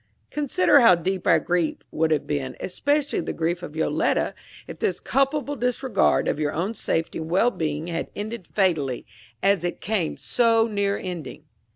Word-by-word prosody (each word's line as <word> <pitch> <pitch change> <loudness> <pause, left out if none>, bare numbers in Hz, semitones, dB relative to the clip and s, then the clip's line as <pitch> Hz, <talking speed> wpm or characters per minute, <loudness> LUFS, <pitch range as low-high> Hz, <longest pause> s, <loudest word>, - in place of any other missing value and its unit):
Consider 285 -5 +3
how 230 -7 +7
deep 185 +2 -2
our - - +6
grief 175 -3 0
would 160 0 +1
have 155 -2 +1
been, 140 -3 -3
especially 285 +9 0
the - - -3
grief 170 +2 -1
of 155 - -8
Yoletta, 160 - +1 0.3
if - - -9
this - - 0
culpable 285 +1 0
disregard 250 -1 +1
of - - 0
your 150 -1 0
own 185 +8 -1
safety 165 -7 -2
and 160 0 -5
well 195 +8 +3
being 155 -4 -3
had 170 -1 -3
ended 210 -2 -5
fatally, 155 - 0 0.4
as 195 -3 +3
it 175 - -3
came 200 -6 -1
so 230 -2 +3
near 200 -2 0
ending! 180 -4 -6
185 Hz, 170 wpm, -24 LUFS, 160-230 Hz, 0.4 s, how